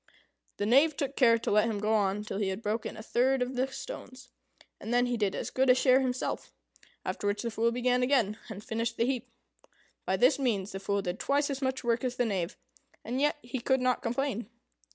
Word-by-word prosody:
The 205 - -1
Knave 280 +7 +4
took 275 -3 -2
care 230 -3 +5
to 230 - -3
let 210 +2 +4
him 215 - -2
go 210 +2 0
on 205 -1 +1
till 210 -1 -4
he 205 - 0
had 190 +4 -4
broken 220 +1 -2
a 220 - -8
third 255 +3 +2
of 250 +1 -5
the 255 +2 +1
stones, 265 - -9 0.5
and 225 - -6
then 245 +1 +3
he 245 0 -1
did 205 -4 0
as - - -4
good 260 0 +2
a 250 - +8
share 255 0 +5
himself; 255 -1 -2 0.5
after 205 - -2
which 205 +3 -1
the 235 - -2
Fool 230 +1 +1
began 250 +1 +1
again, 250 -5 +2
and 210 -1 -7
finished 230 0 -2
the 230 - +2
heap. 255 -1 -2 0.8
By - - +1
this - - +4
means 210 -7 0
the 195 - -5
Fool 200 0 -1
did 180 +1 -3
twice 285 +1 +1
as 275 0 -4
much 260 0 -1
work 235 0 +1
as 250 -1 -1
the 245 - +1
Knave, 190 -4 -2 0.5
and 250 +4 -2
yet 295 +1 +2
he 240 +2 -4
could 265 +2 +2
not 250 0 +1
complain. 240 -2 -2
240 Hz, 225 wpm, -30 LUFS, 215-260 Hz, 0.8 s, a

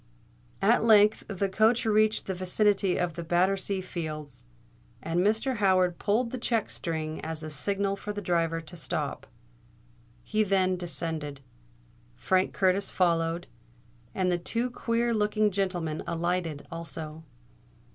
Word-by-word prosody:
At 225 +4 +4
length 215 -1 +5
the 200 -1 -1
coach 220 +5 +3
reached 215 0 +3
the 190 - -2
vicinity 190 +1 +1
of 175 -2 -1
Battersea 190 +2 +1
Fields; 155 - -6 0.5
and 165 +1 -1
Mr. 220 +7 +1
Howard 185 -3 +3
pulled 230 +3 +1
the 255 - -4
check 230 -2 0
string 160 -2 -4
as 160 0 -4
a 155 - -6
signal 195 +6 -1
for 210 +1 -6
the 205 - -4
driver 165 -3 0
to 165 +2 -11
stop. 165 - -3 1.0
He 215 0 0
then 190 -2 +2
descended; 160 -5 -3 0.7
Frank 185 0 +1
Curtis 190 +1 +1
followed; 170 -1 +1 0.7
and 185 -1 +1
the 175 - +1
two 235 +8 -1
queer 235 0 0
looking 210 0 +2
gentlemen 180 -5 -1
alighted 170 -3 -2
also. 160 -1 -6
185 Hz, 130 wpm, -28 LUFS, 165-210 Hz, 1.0 s, length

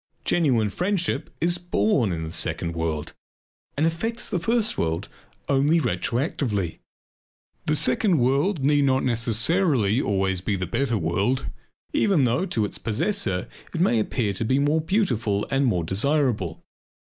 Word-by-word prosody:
Genuine 125 -11 +2
friendship 180 - -1
is 175 +2 +1
born 110 - +1
in 80 -1 -3
the 80 - -5
second 85 0 -1
world 80 -2 -3 0.6
and 150 - +2
affects 225 +9 -1
the 185 - -1
first 225 +4 0
world 80 0 -2 0.4
only 145 +4 +3
retroactively. 115 - -1 0.9
The 155 - +2
second 205 +1 +2
world 140 +6 +1
need 145 +1 +3
not 130 -1 +2
necessarily 120 - +2
always 95 -4 0
be 100 +2 -1
the 95 -1 -2
better 120 +5 0
world 100 +10 0 0.5
even 200 - +3
though 125 +10 +1
to 110 - 0
its - - -6
possessor 115 - -1 0.3
it - - -2
may 145 -10 +3
appear 110 -1 -1
to 100 - -3
be 130 +4 +1
the 140 - +2
more 155 +2 +2
beautiful 120 - 0
and 135 0 +2
the - - +3
more 90 -6 0
desirable. 105 - 0
130 Hz, 150 wpm, -24 LUFS, 100-165 Hz, 0.9 s, only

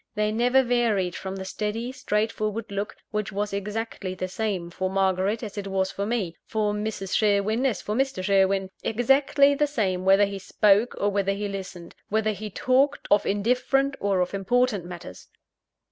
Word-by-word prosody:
They 210 0 +1
never 245 +4 +3
varied 225 -7 +1
from 190 0 -5
the 190 0 -6
steady, 215 +5 -3
straightforward 215 -2 -2
look, 200 +1 -3 0.2
which 210 -2 -2
was 205 +1 -2
exactly 200 -1 -4
the 185 0 -3
same 185 -3 -3
for 185 +1 -2
Margaret 195 +3 +1
as 210 -1 -5
it 200 - -5
was 190 0 0
for 200 +1 -3
me; 205 -8 -2
for 210 -1 0
Mrs. 210 -2 -3
Sherwin 215 +4 +2
as 220 -8 -2
for 210 - -2
Mr. 265 -5 0
Sherwin 195 -1 +2
exactly 275 +4 +3
the 295 +1 +1
same 195 -10 -1
whether 195 +2 +5
he 200 0 -5
spoke 205 +4 +3
or 205 - +1
whether 195 -1 0
he 205 +1 -3
listened; 190 -3 -7 0.2
whether 215 +1 +1
he 215 +1 -6
talked 270 +7 +1
of 205 - +4
indifferent, 250 +6 +1
or 195 -2 +1
of 180 - -1
important 205 0 +1
matters. 175 - -9
205 Hz, 175 wpm, -25 LUFS, 195-225 Hz, 0.2 s, whether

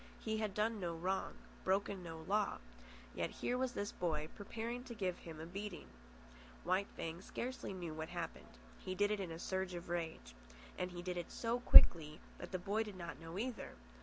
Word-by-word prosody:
He 220 -1 -1
had 210 -3 -1
done 215 +1 +1
no 170 -3 -2
wrong, 185 +3 -1 0.3
broken 195 0 +1
no 165 -2 -6
law, 205 +3 +1 0.6
yet - - -1
here 245 - -1
was 255 -1 0
this 205 0 -2
boy 155 -3 -1
preparing 230 +4 -4
to 240 -2 -7
give 185 -4 -1
him 160 -2 -8
a 160 - -5
beating. 195 +2 -5 0.8
White 185 +3 +2
Fang 165 +2 -4
scarcely 255 +4 -4
knew 175 -4 -4
what 160 0 -4
happened. - - -5 0.3
He 185 - -3
did 205 +2 +3
it 210 - +1
in 190 -3 -2
a 165 - -5
surge 190 +1 -2
of 175 0 -6
rage. 160 - -3 0.4
And 180 - -1
he 175 -1 -6
did 180 0 -2
it 175 - -3
so 235 +1 0
quickly 155 -9 +9 0.2
that - - -7
the 185 - 0
boy 200 +5 0
did 210 -3 -4
not 175 -2 -6
know 165 +2 -6
either. 245 +2 -3
185 Hz, 195 wpm, -38 LUFS, 170-210 Hz, 0.8 s, quickly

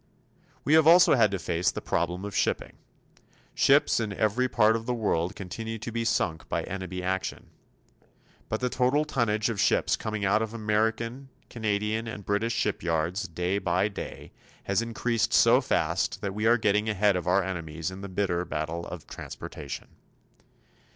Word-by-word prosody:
We 150 - +2
have 160 -1 +6
also 175 +2 +7
had 115 -5 +5
to 100 - -2
face 85 -1 0
the - - -4
problem 90 +3 -2
of 105 - -6
shipping. - - 0 0.8
Ships - - +4
in 110 -3 -2
every 110 +5 +1
part 110 -1 +4
of 115 +1 -4
the 125 - 0
world 95 -5 0
continue 110 +4 -5
to 115 +2 -6
be 115 0 -2
sunk 80 -7 -1
by - - -1
enemy 95 -1 -5
action. 95 0 -3 1.0
But 110 - -2
the 125 - +1
total 135 +5 +2
tonnage 115 -7 0
of 105 - -2
ships - - +2
coming 110 -2 -3
out 105 +3 +3
of 110 0 -4
American, 115 +4 -1 0.2
Canadian 110 0 -1
and 105 -3 -7
British 110 +3 0
shipyards, 85 -1 -1
day 90 +4 -1
by 95 +2 +1
day, 100 - -8 0.3
has 95 +3 +1
increased 115 -1 -1
so - - +6
fast - - 0
that 100 -1 -3
we 105 +2 0
are 120 +1 +5
getting 105 0 +1
ahead 105 -1 +2
of 90 -1 -3
our 95 +2 +3
enemies 85 -2 -4
in 95 +1 -9
the 100 - -6
bitter 95 -2 0
battle 85 0 -4
of 90 -3 -8
transportation. 70 -2 -8
105 Hz, 170 wpm, -27 LUFS, 90-115 Hz, 1.0 s, also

